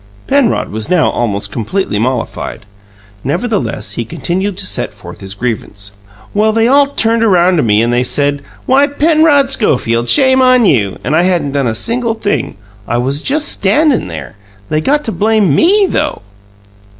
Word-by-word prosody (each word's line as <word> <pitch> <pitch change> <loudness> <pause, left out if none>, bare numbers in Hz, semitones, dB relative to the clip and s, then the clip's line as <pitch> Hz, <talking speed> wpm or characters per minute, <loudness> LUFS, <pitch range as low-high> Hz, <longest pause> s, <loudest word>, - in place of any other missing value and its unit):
Penrod 275 -5 +1
was 110 0 -4
now 180 -4 +2
almost 105 -3 -2
completely 115 - -2
mollified; 120 -1 -3 0.6
nevertheless, 205 - -2
he 120 - -4
continued 185 - -3
to 200 - -3
set - - -4
forth - - -12
his 95 +1 -7
grievance. 100 -3 -5 0.4
"Well, 215 +1 +2
they 225 +1 +2
all 280 +2 +4
turned 230 -4 0
around 180 -4 +3
to - - +2
me 110 -3 +2
and 120 +1 0
they 120 +1 +1
said, 145 +3 0 0.2
'Why, 275 +2 +3
Penrod 295 -1 +2
Schofield, 120 - 0
shame 260 -2 +4
on 255 -2 +4
you!' 105 - +1
And 145 +5 0
I 165 - +4
hadn't 175 -6 0
done 140 -2 -1
a 110 - -2
single 235 - -1
thing! 205 -2 -2 0.3
I 120 - -1
was 135 +4 -1
just 295 - +1
standin' 255 - +1
there. 80 +3 -8 0.3
They 155 0 0
got 295 - +1
to 225 - -3
blame 210 -6 +1
ME, 395 - +4
though!" - - -2
185 Hz, 170 wpm, -13 LUFS, -, 0.6 s, all